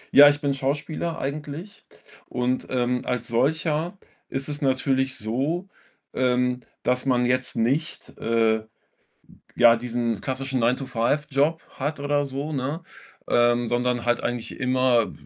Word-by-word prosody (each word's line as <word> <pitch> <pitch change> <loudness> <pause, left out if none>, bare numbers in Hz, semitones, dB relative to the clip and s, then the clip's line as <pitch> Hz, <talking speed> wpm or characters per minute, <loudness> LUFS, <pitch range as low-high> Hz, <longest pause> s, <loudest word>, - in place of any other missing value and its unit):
Ja, 145 +1 +11
ich 145 0 -1
bin 140 -2 +1
Schauspieler 150 +5 -2
eigentlich, 150 +7 -6 0.4
und, 125 +1 -1
ähm, 125 -1 0
als 125 -1 -2
solcher 155 +8 0 0.3
ist 135 +1 -3
es 145 0 -4
natürlich 130 -1 +1
so, 140 - -2 0.4
ähm, 125 0 +1 0.2
dass 125 +2 0
man 125 -1 +3
jetzt 125 +1 0
nicht, 130 +7 -1
äh, 110 -1 +2 0.9
ja, 115 -1 +7
diesen 115 -2 -2
klassischen 135 0 -2
Nine-to-five 125 +3 +1
Job 150 +4 +1 0.2
hat 145 +3 -2
oder 145 0 +1
so, 140 +3 -4
ne, 145 +5 -3 0.4
ähm, 120 0 +3
sondern 120 0 0
halt 120 0 +2
eigentlich 120 -1 -3
immer 130 -3 +2
130 Hz, 130 wpm, -24 LUFS, 120-145 Hz, 0.9 s, Ja